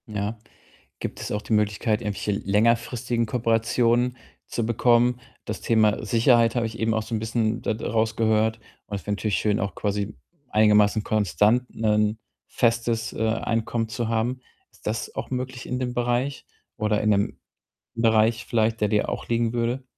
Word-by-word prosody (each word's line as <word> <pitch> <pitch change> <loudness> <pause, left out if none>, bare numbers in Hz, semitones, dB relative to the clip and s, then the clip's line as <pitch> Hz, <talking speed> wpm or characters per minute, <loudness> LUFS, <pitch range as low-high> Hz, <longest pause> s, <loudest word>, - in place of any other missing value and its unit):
Ja. 105 +1 -3 0.6
Gibt - - -5
es - - -5
auch 105 - -1
die 110 - -3
Möglichkeit, 105 +1 +1
irgendwelche 105 -1 -2
längerfristigen 115 +4 +1
Kooperationen 120 +1 +1 0.3
zu 115 - -2
bekommen? 120 +2 +3 0.3
Das 110 - -5
Thema 110 -1 +2
Sicherheit 115 +1 +4
habe 120 -1 +1
ich 115 +1 -9
eben 110 0 +1
auch 110 - 0
so 115 +1 -4
'n - - -1
bisschen 110 +1 -1
da - - 0
d 110 - -6
rausgehört 110 0 +1 0.3
und 100 - -4
es 100 - -5
wäre 105 - 0
natürlich 105 -3 -1
schön, 105 +1 +1
auch 100 -2 -3
quasi 105 0 -2 0.3
einigermaßen 105 0 +4
konstant 105 +4 +2
'nen 105 0 +1 0.3
festes, 115 -1 0
äh, 110 - -1
Einkommen, 115 0 -1
zu 115 +1 -3
haben. 120 +3 -1 0.3
Ist - - -24
das 110 +1 -3
auch - - -4
möglich 130 0 -4
in 125 - -2
dem 125 -1 -2
Bereich 120 +3 -1 0.3
oder 105 -1 +1
in 105 - +1
'nem 100 -1 +1 0.6
Bereich 115 +1 +2
vielleicht, 110 -1 +1
der 105 - +3
dir 105 -1 +1
auch - - -5
liegen 115 -1 0
würde? 120 +2 -1
115 Hz, 170 wpm, -24 LUFS, 105-120 Hz, 0.6 s, Sicherheit